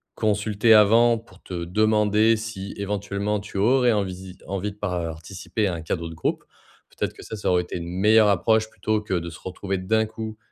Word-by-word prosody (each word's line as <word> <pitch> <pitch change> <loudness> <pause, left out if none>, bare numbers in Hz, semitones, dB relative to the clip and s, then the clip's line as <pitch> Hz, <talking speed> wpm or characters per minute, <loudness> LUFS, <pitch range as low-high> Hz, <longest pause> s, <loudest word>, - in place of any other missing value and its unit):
consulter 105 +1 +2
avant 115 +3 +6
pour 105 -4 -16
te 90 -2 -5
demander 105 +3 +3
si, 110 -3 -6
éventuellement, 100 +1 -2
tu 100 0 -8
aurais 125 +4 +4
envisi 95 -2 -4
envie 100 +2 -3
de 100 - -17
participer 90 +2 -3
à 90 - -1
un 80 - -6
cadeau 85 +1 -3
de - - -8
groupe. - - -2 0.5
Peut-être - - -3
que - - -13
ça, 110 - -7
ça 100 - -1
aurait 90 -1 +3
été 90 - -6
une 85 -1 -6
meilleure 105 +4 +4
approche, 110 +3 +2
plutôt 110 -1 -1
que 105 -2 -5
de 85 -2 -1
se 80 - -11
retrouver 95 +1 -4
d'un 110 +4 +1
coup 110 0 -7
105 Hz, 195 wpm, -24 LUFS, 95-110 Hz, 0.5 s, avant